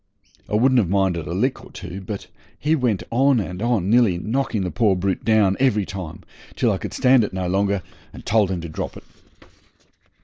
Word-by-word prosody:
I -, -, 0 dB
wouldn't 130 Hz, +3 st, +4 dB
have 95 Hz, -7 st, +1 dB
minded 95 Hz, -4 st, 0 dB
a -, -, -4 dB
lick 125 Hz, +8 st, -1 dB
or -, -, -13 dB
two, 90 Hz, +3 st, -8 dB
but 100 Hz, +1 st, -6 dB, 0.3 s
he 150 Hz, +2 st, 0 dB
went 120 Hz, -, 0 dB
on 130 Hz, +1 st, +3 dB
and 95 Hz, -2 st, -5 dB
on, 115 Hz, -6 st, +1 dB
nearly 110 Hz, -4 st, +4 dB
knocking 115 Hz, +1 st, -1 dB
the 90 Hz, -, -3 dB
poor 105 Hz, -5 st, +2 dB
brute 95 Hz, 0 st, -2 dB
down 105 Hz, -4 st, +3 dB
every 110 Hz, -7 st, +2 dB
time, 90 Hz, -4 st, -7 dB, 0.3 s
till -, -, +2 dB
I -, -, -1 dB
could -, -, -6 dB
stand 130 Hz, -2 st, +4 dB
it 105 Hz, -, -4 dB
no 95 Hz, -1 st, -2 dB
longer, 100 Hz, 0 st, 0 dB, 0.3 s
and -, -, -12 dB
told 105 Hz, -3 st, +2 dB
him 90 Hz, -3 st, -2 dB
to 85 Hz, -, -6 dB
drop 80 Hz, -, -5 dB
it. -, -, -12 dB
100 Hz, 205 wpm, -22 LUFS, 95-120 Hz, 0.3 s, wouldn't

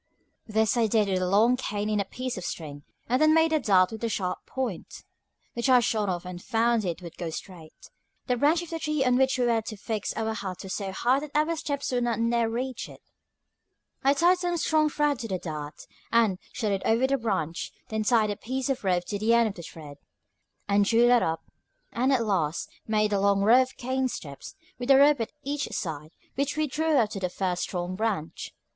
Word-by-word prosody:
This 220 Hz, +1 st, +1 dB
I 230 Hz, -2 st, +3 dB
did 215 Hz, -1 st, +2 dB
with 185 Hz, -1 st, 0 dB
a 180 Hz, -, 0 dB
long 220 Hz, +6 st, +4 dB
cane 210 Hz, -5 st, -3 dB
and 210 Hz, -1 st, +1 dB
a -, -, -3 dB
piece 255 Hz, +5 st, -5 dB
of 185 Hz, -, -6 dB
string, 145 Hz, -4 st, -6 dB, 0.3 s
and 255 Hz, +4 st, +1 dB
then 310 Hz, 0 st, +5 dB
made 320 Hz, 0 st, +3 dB
a 310 Hz, -, +3 dB
dart 190 Hz, -7 st, +3 dB
with 220 Hz, +1 st, -7 dB
a 230 Hz, -, 0 dB
sharp 185 Hz, -4 st, -3 dB
point, 250 Hz, -9 st, -5 dB, 0.5 s
which 235 Hz, +3 st, -1 dB
I 255 Hz, -1 st, +7 dB
shot 215 Hz, -3 st, 0 dB
off 175 Hz, -1 st, -3 dB
and 180 Hz, -1 st, -7 dB
found 230 Hz, 0 st, +1 dB
it 175 Hz, 0 st, -4 dB
would 170 Hz, -1 st, -10 dB
go 170 Hz, -, -3 dB
straight. 160 Hz, -1 st, -10 dB, 0.3 s
The 250 Hz, -, +1 dB
branch 300 Hz, +7 st, +2 dB
of 340 Hz, -, -10 dB
the 330 Hz, -, -3 dB
tree 305 Hz, -3 st, 0 dB
on 250 Hz, -1 st, +3 dB
which 265 Hz, +1 st, +2 dB
we 250 Hz, -, +1 dB
were 230 Hz, -2 st, +2 dB
to 215 Hz, -1 st, -7 dB
fix 215 Hz, 0 st, -3 dB
our 220 Hz, 0 st, -1 dB
hut 190 Hz, -4 st, -6 dB
was 190 Hz, -, -5 dB
so 195 Hz, -2 st, -3 dB
high 245 Hz, +7 st, +2 dB
that 295 Hz, 0 st, -9 dB
our 310 Hz, +2 st, +2 dB
steps 285 Hz, -3 st, -3 dB
would 245 Hz, -1 st, 0 dB
not 235 Hz, -2 st, 0 dB
near 230 Hz, 0 st, +1 dB
reach 250 Hz, +2 st, -4 dB
it. -, -, -14 dB, 1.0 s
I 275 Hz, +1 st, +4 dB
tied 350 Hz, +4 st, +4 dB
some 350 Hz, -1 st, -1 dB
strong 310 Hz, -1 st, +2 dB
thread 295 Hz, -3 st, 0 dB
to 230 Hz, -, -4 dB
the 190 Hz, -3 st, -2 dB
dart, 150 Hz, -4 st, -7 dB, 0.3 s
and 225 Hz, -5 st, +3 dB
shot 225 Hz, -5 st, -2 dB
it 195 Hz, -1 st, -1 dB
over 230 Hz, +3 st, +3 dB
the 275 Hz, 0 st, +1 dB
branch; 170 Hz, -8 st, -2 dB, 0.2 s
then 220 Hz, 0 st, -1 dB
tied 215 Hz, -1 st, +3 dB
a 205 Hz, -, -4 dB
piece 260 Hz, +3 st, -3 dB
of 265 Hz, -4 st, -1 dB
rope 180 Hz, -2 st, +1 dB
to 205 Hz, -, -4 dB
the 225 Hz, +2 st, +3 dB
end 235 Hz, -1 st, +4 dB
of -, -, -6 dB
the 175 Hz, -, -9 dB
thread, 150 Hz, -3 st, -10 dB, 0.7 s
and 200 Hz, 0 st, +3 dB
drew 230 Hz, +4 st, +4 dB
that 245 Hz, 0 st, +5 dB
up, 160 Hz, 0 st, -1 dB, 0.5 s
and 255 Hz, +3 st, +1 dB
at 245 Hz, -4 st, +2 dB
last 165 Hz, -7 st, -1 dB, 0.2 s
made 215 Hz, -1 st, +1 dB
a 200 Hz, -, +2 dB
long 200 Hz, 0 st, +3 dB
row 235 Hz, +5 st, +6 dB
of 260 Hz, 0 st, -4 dB
cane 260 Hz, +1 st, -1 dB
steps, 140 Hz, -, -8 dB, 0.2 s
with 245 Hz, +1 st, -5 dB
a 270 Hz, -, +8 dB
rope 285 Hz, -2 st, +5 dB
at 225 Hz, -, -3 dB
each 285 Hz, 0 st, -2 dB
side, 155 Hz, -4 st, -5 dB, 0.2 s
which 280 Hz, +3 st, -2 dB
we 310 Hz, -, +2 dB
drew 310 Hz, +2 st, +1 dB
up 220 Hz, -4 st, +2 dB
to 195 Hz, -, -4 dB
the 180 Hz, -1 st, -1 dB
first 180 Hz, -1 st, -2 dB
strong 180 Hz, 0 st, -3 dB
branch. 200 Hz, -6 st, -3 dB
225 Hz, 230 wpm, -27 LUFS, 190-260 Hz, 1.0 s, a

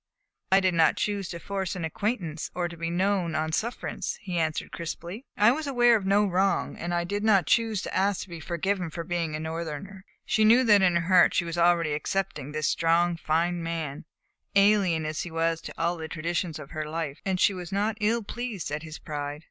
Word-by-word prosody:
"I 190 Hz, +1 st, +6 dB
did 185 Hz, -1 st, +2 dB
not 165 Hz, -1 st, +4 dB
choose 200 Hz, -3 st, -1 dB
to 170 Hz, -, -5 dB
force 195 Hz, +1 st, -3 dB
an 175 Hz, -3 st, -3 dB
acquaintance 170 Hz, -3 st, -3 dB
or 175 Hz, -1 st, 0 dB
to 170 Hz, -, -9 dB
be 165 Hz, 0 st, -3 dB
known 180 Hz, -1 st, 0 dB
on 160 Hz, 0 st, -1 dB
sufferance," 230 Hz, +9 st, -3 dB
he 180 Hz, -3 st, -2 dB
answered 160 Hz, -1 st, -2 dB
crisply. 175 Hz, -, -6 dB
"I 210 Hz, +3 st, +6 dB
was 305 Hz, +3 st, -2 dB
aware 240 Hz, -3 st, +5 dB
of 200 Hz, -3 st, -1 dB
no 205 Hz, +2 st, +4 dB
wrong, 195 Hz, +1 st, +1 dB
and 175 Hz, -, -5 dB
I 175 Hz, 0 st, +1 dB
did 205 Hz, +4 st, -3 dB
not 200 Hz, -6 st, +4 dB
choose 225 Hz, -4 st, +1 dB
to -, -, -5 dB
ask 195 Hz, +1 st, +1 dB
to -, -, -14 dB
be 170 Hz, -1 st, -7 dB
forgiven 180 Hz, +2 st, -2 dB
for 170 Hz, +1 st, -5 dB
being 165 Hz, -2 st, -2 dB
a -, -, -3 dB
Northerner." 165 Hz, +4 st, -5 dB, 0.2 s
She 220 Hz, -, +2 dB
knew 235 Hz, +4 st, +6 dB
that 210 Hz, -4 st, +6 dB
in 180 Hz, -2 st, +4 dB
her 170 Hz, -, +3 dB
heart 185 Hz, -2 st, +5 dB
she 170 Hz, -, +2 dB
was 165 Hz, 0 st, -4 dB
already 170 Hz, -2 st, +3 dB
accepting 150 Hz, -2 st, -2 dB
this 155 Hz, -1 st, -1 dB
strong, 170 Hz, +1 st, +2 dB
fine 170 Hz, +2 st, 0 dB
man, 165 Hz, -4 st, -4 dB, 0.5 s
alien 200 Hz, -5 st, +4 dB
as 155 Hz, 0 st, -2 dB
he 175 Hz, -, -5 dB
was 165 Hz, 0 st, 0 dB
to -, -, -8 dB
all 170 Hz, +1 st, 0 dB
the 160 Hz, -1 st, -5 dB
traditions 170 Hz, +1 st, -2 dB
of 150 Hz, -1 st, -10 dB
her 155 Hz, -2 st, -4 dB
life, 160 Hz, -2 st, -4 dB
and 190 Hz, -2 st, -1 dB
she 200 Hz, -, +4 dB
was 180 Hz, -2 st, -7 dB
not 205 Hz, +2 st, 0 dB
ill 225 Hz, +2 st, +1 dB
pleased 220 Hz, -7 st, -5 dB
at 150 Hz, +1 st, -2 dB
his 160 Hz, 0 st, -8 dB
pride. 145 Hz, -1 st, -5 dB
175 Hz, 220 wpm, -27 LUFS, 160-200 Hz, 0.5 s, I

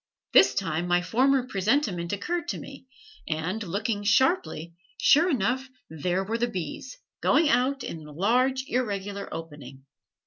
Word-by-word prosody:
This -, -, +6 dB
time 165 Hz, +3 st, -1 dB
my 175 Hz, 0 st, +2 dB
former 260 Hz, +6 st, +2 dB
presentiment 195 Hz, -5 st, 0 dB
occurred 345 Hz, -, -2 dB
to -, -, -2 dB
me, 270 Hz, -1 st, -11 dB, 0.4 s
and, 165 Hz, +7 st, -2 dB
looking 205 Hz, +2 st, -2 dB
sharply, 210 Hz, -, +1 dB, 0.3 s
sure 325 Hz, +6 st, +5 dB
enough 260 Hz, -, 0 dB, 0.2 s
there 175 Hz, +4 st, -1 dB
were 225 Hz, +4 st, -3 dB
the 240 Hz, -, +1 dB
bees, 185 Hz, -, -6 dB, 0.2 s
going 310 Hz, -1 st, +3 dB
out 265 Hz, +1 st, +1 dB
and 165 Hz, -, -6 dB
in 150 Hz, -, -12 dB
a -, -, -11 dB
large, 250 Hz, -, +1 dB
irregular 200 Hz, -6 st, -3 dB
opening. 145 Hz, -5 st, -9 dB
205 Hz, 145 wpm, -26 LUFS, 175-260 Hz, 0.4 s, This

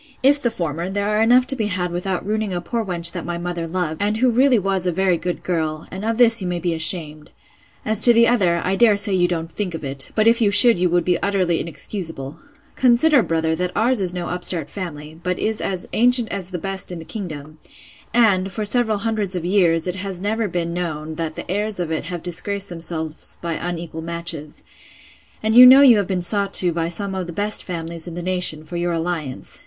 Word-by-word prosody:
If 285 Hz, +2 st, +4 dB
the 240 Hz, -, +1 dB
former, 170 Hz, -3 st, -4 dB
there 200 Hz, +1 st, -2 dB
are 210 Hz, +1 st, +1 dB
enough 245 Hz, +3 st, +4 dB
to 270 Hz, -, +4 dB
be 220 Hz, -5 st, -2 dB
had 180 Hz, -3 st, -3 dB
without 180 Hz, +1 st, -3 dB
ruining 210 Hz, -2 st, -2 dB
a -, -, -1 dB
poor 230 Hz, +6 st, -3 dB
wench 170 Hz, -4 st, +1 dB
that 175 Hz, -, -6 dB
my 175 Hz, 0 st, -4 dB
mother 175 Hz, -1 st, -4 dB
loved, 165 Hz, -2 st, -3 dB
and 210 Hz, +1 st, 0 dB
who 250 Hz, +1 st, +2 dB
really 255 Hz, +1 st, +3 dB
was 195 Hz, -2 st, -1 dB
a -, -, +1 dB
very 185 Hz, +1 st, +1 dB
good 175 Hz, +1 st, -5 dB
girl: 160 Hz, -3 st, -3 dB
and 190 Hz, +2 st, -7 dB
of 225 Hz, +1 st, -1 dB
this 230 Hz, -2 st, +5 dB
you 185 Hz, -, -3 dB
may 180 Hz, 0 st, -2 dB
be 170 Hz, 0 st, -2 dB
ashamed. 160 Hz, -2 st, -2 dB, 0.6 s
As 215 Hz, -1 st, 0 dB
to 240 Hz, -, +8 dB
the 235 Hz, 0 st, +4 dB
other, 180 Hz, -8 st, +1 dB
I 190 Hz, -, 0 dB
dare 215 Hz, -1 st, +4 dB
say 200 Hz, 0 st, +3 dB
you 175 Hz, -1 st, +2 dB
don't 165 Hz, -2 st, -4 dB
think 185 Hz, -3 st, -4 dB
of 160 Hz, -, -8 dB
it; 135 Hz, -1 st, -2 dB
but 215 Hz, -, +2 dB
if 230 Hz, +1 st, +3 dB
you 210 Hz, -, +3 dB
should, 205 Hz, 0 st, +7 dB
you 180 Hz, 0 st, +1 dB
would 175 Hz, +1 st, 0 dB
be 180 Hz, -2 st, 0 dB
utterly 185 Hz, -4 st, 0 dB
inexcusable. 165 Hz, -5 st, -4 dB, 0.4 s
Consider, 260 Hz, +3 st, +4 dB
brother, 160 Hz, -4 st, -1 dB
that 180 Hz, +1 st, -2 dB
ours 240 Hz, -1 st, +2 dB
is 180 Hz, -2 st, +1 dB
no 180 Hz, -1 st, -5 dB
upstart 175 Hz, -4 st, -3 dB
family; 160 Hz, -4 st, -8 dB
but 180 Hz, +1 st, -2 dB
is 220 Hz, 0 st, -2 dB
as 185 Hz, -2 st, -2 dB
ancient 245 Hz, 0 st, +3 dB
as 190 Hz, -3 st, -5 dB
the 180 Hz, -, -5 dB
best 190 Hz, +2 st, -3 dB
in 175 Hz, -, -6 dB
the 165 Hz, -, -10 dB
kingdom! 155 Hz, -7 st, -8 dB, 0.5 s
and, 200 Hz, -5 st, +2 dB
for 210 Hz, +4 st, -3 dB
several 220 Hz, 0 st, +2 dB
hundreds 210 Hz, -3 st, -2 dB
of 175 Hz, -2 st, -4 dB
years, 175 Hz, -4 st, +2 dB
it 180 Hz, 0 st, -2 dB
has 190 Hz, -1 st, -5 dB
never 215 Hz, +3 st, -2 dB
been 170 Hz, -2 st, -3 dB
known, 160 Hz, -3 st, -4 dB
that 160 Hz, -1 st, -5 dB
the -, -, -7 dB
heirs 205 Hz, +2 st, -2 dB
of 170 Hz, -2 st, -3 dB
it 160 Hz, -, -3 dB
have 175 Hz, 0 st, -6 dB
disgraced 200 Hz, +3 st, -2 dB
themselves 165 Hz, -2 st, -4 dB
by 170 Hz, -1 st, -4 dB
unequal 170 Hz, -1 st, -5 dB
matches: 170 Hz, -2 st, -4 dB, 0.8 s
And 220 Hz, 0 st, 0 dB
you 250 Hz, +1 st, +10 dB
know 265 Hz, +2 st, +8 dB
you 250 Hz, -5 st, +7 dB
have 200 Hz, -3 st, -1 dB
been 185 Hz, -2 st, -2 dB
sought 200 Hz, +2 st, 0 dB
to 175 Hz, -2 st, +6 dB
by 165 Hz, 0 st, -2 dB
some 195 Hz, +3 st, -4 dB
of 185 Hz, -2 st, -4 dB
the -, -, -6 dB
best 205 Hz, +4 st, -1 dB
families 170 Hz, -1 st, -2 dB
in 170 Hz, -, -7 dB
the 175 Hz, -, -6 dB
nation, 180 Hz, -4 st, +1 dB
for 175 Hz, +2 st, -6 dB
your 175 Hz, 0 st, -1 dB
alliance. 165 Hz, -5 st, -4 dB
180 Hz, 230 wpm, -20 LUFS, 170-210 Hz, 0.8 s, you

